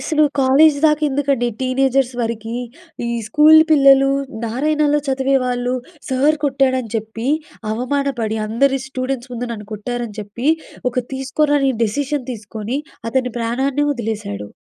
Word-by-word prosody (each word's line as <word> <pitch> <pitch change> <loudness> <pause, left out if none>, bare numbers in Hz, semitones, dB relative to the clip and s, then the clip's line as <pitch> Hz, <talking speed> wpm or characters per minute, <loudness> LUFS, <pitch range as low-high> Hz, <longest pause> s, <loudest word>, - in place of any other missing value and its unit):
అసలు 305 -2 +1 0.2
కాలేజ్ 285 +3 +5
దాకా 305 -1 +3
ఎందుకండి, 275 -3 0
టీనేజర్స్ 260 0 +1
వరకి, 225 -1 -3 0.5
ఈ - - -2 0.2
స్కూల్ 305 +6 +7
పిల్లలు, 275 -2 +6 0.4
నారాయణలో 295 +5 +1
చదివేవాళ్ళు 255 -2 0 0.3
సార్ 275 +4 +2
కొట్టాడని 260 -4 +1
చెప్పి, 225 +3 -4 0.4
అవమానపడి, 245 -2 -1
అందరి 270 +5 +2
స్టూడెంట్స్ 255 -1 -4
ముందు 245 0 -4
నన్ను 210 -2 -8
కొట్టారని 230 0 -5
చెప్పి, 215 +7 -4 0.4
ఒక 250 - -17 0.2
తీసుకోరాని 275 +1 +1
డెసిషన్ 270 +4 -2
తీసుకొని 215 +3 -5 0.3
అతని 250 0 0
ప్రాణాన్నే 265 +5 0
వదిలేశాడు. 210 - -4
260 Hz, 115 wpm, -19 LUFS, 230-275 Hz, 0.5 s, స్కూల్